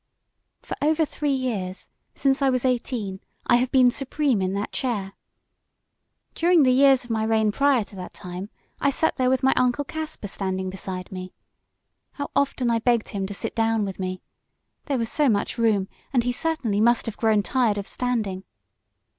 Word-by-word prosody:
"For - - -5
over 310 +2 +3
three 295 0 -3
years 225 -9 -2 0.2
since 270 0 +1
I 275 - +4
was 255 -1 0
eighteen 235 -6 -1 0.3
I - - +5
have 250 +1 0
been 255 -2 +5
supreme 275 -4 0
in 185 0 0
that 200 +1 -3
chair. 205 -7 -2 1.2
During 340 -2 +4
the 255 - +5
years 270 0 +5
of 240 - -8
my 220 -1 0
reign 220 -1 +2
prior 275 0 +3
to 200 - -14
that 180 - -8
time 180 +3 -7 0.3
I - - +3
sat 320 +3 +1
there 255 -2 +2
with 260 0 +1
my 265 - +5
Uncle 250 +3 +2
Caspar 310 -6 -5
standing 190 -1 -3
beside 185 -1 -6
me. 185 -1 -7 0.8
How 285 0 -5
often 265 -3 +1
I 230 - +2
begged 235 -1 +1
him 195 -1 -3
to 205 - -6
sit - - -4
down 225 -2 +1
with 195 -1 -6
me! 185 -1 -4 0.6
There 280 -3 0
was 230 -2 -1
so 295 -3 +3
much 205 +1 0
room 210 -4 +2 0.2
and 245 -4 +2
he 245 - 0
certainly 245 -8 -1
must 235 +1 +3
have 225 - -4
grown 220 -2 +2
tired 235 -3 +1
of 200 - -3
standing. 215 -7 -2
235 Hz, 185 wpm, -24 LUFS, 200-265 Hz, 1.2 s, I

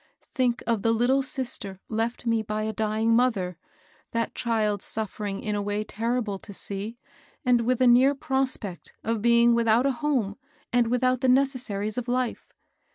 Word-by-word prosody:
Think 245 -2 +1
of 230 -3 +1
the 225 +2 +2
little 245 +4 +3
sister 245 -8 -4
left 230 +2 -2
me 230 -1 +2
by 215 0 -3
a 220 0 -2
dying 220 +1 +1
mother, 215 -8 +1 0.3
— - - -33
that 230 0 -1
child 215 -4 0
suffering 210 -2 -4
in 210 - -2
a 205 - -1
way 205 +1 -1
terrible 225 -1 -2
to 205 - -11
see, 205 +5 -5 0.5
and 245 -1 +4
with 255 -1 +2
a - - +6
near 255 +3 +6
prospect 265 -9 -2
of 225 -1 -1
being 235 +1 +5
without 235 +1 +3
a 275 - +3
home 250 -9 0 0.4
and 240 -1 +4
without 255 +1 +1
the 260 - +3
necessaries 250 -5 +1
of 245 - -7
life 250 -1 -2
230 Hz, 170 wpm, -26 LUFS, 215-250 Hz, 0.5 s, a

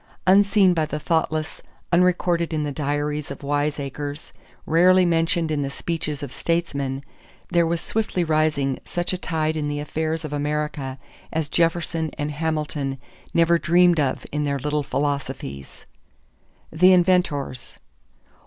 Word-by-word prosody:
Unseen 200 0 +5
by 165 -2 +1
the 150 - -3
thoughtless, 155 0 -1 0.3
unrecorded 175 -1 +2
in 155 - 0
the 145 - -2
diaries 145 +1 -2
of - - -8
wiseacres, 145 0 -3 0.3
rarely 180 +3 +5
mentioned 165 -1 +1
in 150 -2 0
the 140 - -2
speeches 150 -1 -4
of 140 - -6
statesmen, 140 -5 -1 0.5
there 170 -1 +3
was 170 0 0
swiftly 215 -5 -1
rising 155 -4 +1
such 175 +1 -3
a - - -1
tide 160 -3 -1
in 150 -2 -2
the 145 0 -2
affairs 155 +2 -2
of 150 - -6
America 145 -2 -2 0.3
as 160 -2 -2
Jefferson 165 -1 0
and 145 0 -2
Hamilton 150 -3 -2 0.4
never 170 0 +4
dreamed 175 0 +4
of 135 -3 0
in 150 +1 -1
their 140 -1 0
little 150 +2 -1
philosophies. 140 - -4 0.9
=The 180 +4 +6
Inventors. 175 -8 +1
155 Hz, 135 wpm, -23 LUFS, 145-170 Hz, 0.9 s, =The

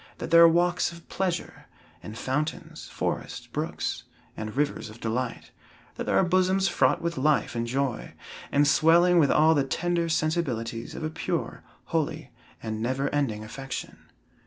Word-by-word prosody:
That - - -6
there 170 0 +8
are 170 - +10
walks 175 +2 +2
of 170 0 -13
pleasure, 180 -3 -3 0.3
and 110 +1 -9
fountains, 150 +5 -3
forests, - - -4
brooks, - - -3 0.3
and 110 +3 -6
rivers 145 -6 -1
of 110 +2 -13
delight; 120 +2 -3 0.4
that - - -5
there - - +2
are - - +5
bosoms 185 +2 +2
fraught 175 - +2
with 170 -2 -2
life 150 +2 +2
and 115 0 -2
joy, 135 0 -2 0.4
and 145 +1 +4
swelling 170 +4 +5
with 145 -4 +4
all 160 +1 +5
the 145 -3 +2
tender 170 +4 -1
sensibilities 135 -9 -1
of - - -6
a 155 - -2
pure, - - -3 0.2
holy 155 -3 -2 0.3
and 110 -1 -4
never 130 +4 -1
ending 120 -8 -1
affection. 135 +4 -7
150 Hz, 160 wpm, -27 LUFS, 125-170 Hz, 0.4 s, are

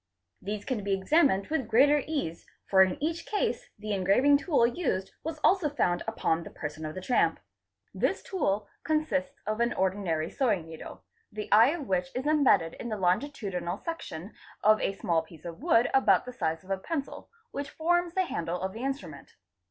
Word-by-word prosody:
These 205 +1 -4
can 245 -6 -2
be 200 -1 +1
examined 200 - +3
with 300 -7 -1
greater 285 +6 +5
ease, 275 - -3 0.2
for 190 -1 +5
in 185 -1 +3
each 330 +2 -2
case - - -1
the 215 0 -4
engraving 200 +10 +4
tool 285 -5 +2
used 235 - -1
was 320 0 -4
also 365 -5 +4
found 175 -11 0
upon 170 -7 0
the - - -9
person 155 +1 -6
of 155 - -7
the 185 - -5
tramp. 245 +6 +2 0.5
This - - 0
tool 210 - -1 0.2
consists 285 -3 -1
of 215 +1 -2
an 235 0 +2
ordinary 185 -4 -1
sewing 210 - 0
needle, 160 -1 -10 0.3
the 210 0 -6
eye 220 +3 +8
of 300 -4 -3
which 180 -1 0
is 255 +2 -2
embedded 270 - +3
in 240 - -5
the 215 - -2
longitudinal 190 -3 -1
section 210 - -6 0.3
of 215 +1 +5
a - - 0
small 170 -6 +1
piece 160 0 -15
of 170 +3 -7
wood 265 -7 +4
about 265 - +4
the 250 - -7
size 160 -9 -2
of 190 - -10
a 195 - +1
pencil, 285 - -5 0.2
which 280 0 -4
forms 350 +1 0
the 375 -1 +2
handle 170 - -3
of 190 +1 -3
the 230 +3 -6
instrument. 185 - -5
215 Hz, 185 wpm, -29 LUFS, 185-285 Hz, 0.5 s, eye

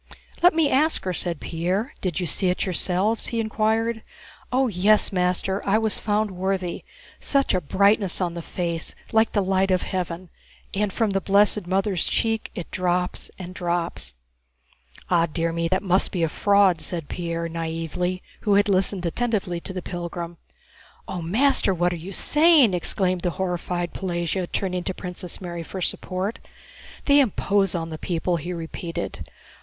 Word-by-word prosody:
"Let 355 -1 +6
me 325 -2 +4
ask 300 +4 +3
her," 185 - -1
said 170 -2 -3
Pierre. 185 - -2
"Did 180 -2 -1
you 180 - -1
see 180 +4 0
it 180 - 0
yourselves?" 190 +4 0
he 230 - -2
inquired. 220 +1 0 0.5
"Oh, 260 +1 +3
yes, 210 +1 +3
master, 180 +1 0
I 200 +2 +3
was 220 -1 +1
found 210 0 0
worthy. 185 -1 -2 0.4
Such 275 -1 +2
a 185 - +1
brightness 200 +4 +3
on 175 -2 -1
the 170 - -5
face 170 -1 -3 0.2
like 220 0 +3
the 205 - +2
light 190 0 +2
of 185 -1 +2
heaven, 180 -2 -4 0.4
and 205 0 0
from 220 +1 0
the 195 0 0
blessed 200 0 +3
Mother's 190 -1 +1
cheek 225 -1 0
it 175 - -6
drops 180 0 -1
and 185 -1 -7
drops...." 170 - -2 0.9
"But, 170 -3 +2
dear 165 -1 0
me, 170 0 0
that 185 +4 0
must 185 -1 +2
be 175 -3 -1
a 165 - +2
fraud!" 200 -1 +3
said 165 -5 -5
Pierre, 170 -1 -3
naïvely, 165 +2 -3 0.2
who 205 -2 +2
had 205 +1 +4
listened 185 -1 +2
attentively 190 -2 -1
to 180 - -7
the 185 -2 -5
pilgrim. 175 -1 -5 0.7
"Oh, 180 - -4
master, 215 +3 +3
what 175 +1 +1
are - - -2
you 170 +4 -7
saying?" 300 - +5
exclaimed 185 +1 +1
the 175 - 0
horrified 175 -1 -2
Pelagéya, 175 -1 -2
turning 180 -2 -1
to 190 - -2
Princess 180 -1 -6
Mary 175 -2 -5
for 185 +3 -7
support. 185 +3 -2 0.7
"They 285 0 +6
impose 200 -6 +2
on 165 -1 -3
the 155 - -6
people," 175 0 -1
he 175 +3 -5
repeated. 165 0 -5
185 Hz, 165 wpm, -24 LUFS, 175-205 Hz, 0.9 s, Let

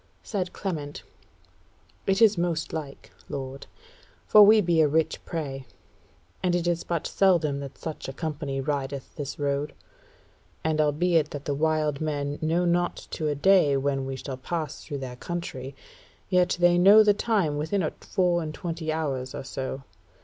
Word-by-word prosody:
Said 190 -4 -3
Clement: 155 -7 -5 1.0
"It 195 +3 +4
is 215 -2 +6
most 170 -2 -1
like, 145 -4 -7 0.2
lord; 135 0 -6 0.6
for 210 - +7
we 215 +2 +8
be 170 -4 +3
a 155 - +5
rich 160 +2 0
prey, 135 -5 -5 0.7
and 180 -1 +1
it 175 -1 0
is 175 -1 0
but 170 -2 -2
seldom 170 -7 +2
that 140 -1 -8
such 160 -4 -6
a - - -6
company 145 -2 -4
rideth 140 -1 -3
this 145 -2 -5
road. 145 0 -2 0.9
And 155 -1 +1
albeit 155 +1 +2
that 145 -1 -7
the 145 - -1
wild 155 -1 0
men 145 -2 -2
know 165 +3 +1
not 175 0 +1 0.2
to 155 - -2
a 145 - 0
day 150 -3 +4
when 135 -1 -1
we 135 - -3
shall 130 0 -6
pass 155 +2 -4
through 145 - -5
their 130 -2 -6
country, 140 -5 -5 0.5
yet 180 -2 +2
they 175 0 +5
know 205 +4 +8
the 210 -1 +5
time 200 -9 0
within 180 +6 0
a 155 - -1
four 175 -2 +1
and 155 -2 -5
twenty 165 -2 -4
hours 135 -5 -3
or - - -5
so. 135 0 -5
155 Hz, 165 wpm, -26 LUFS, 140-175 Hz, 1.0 s, we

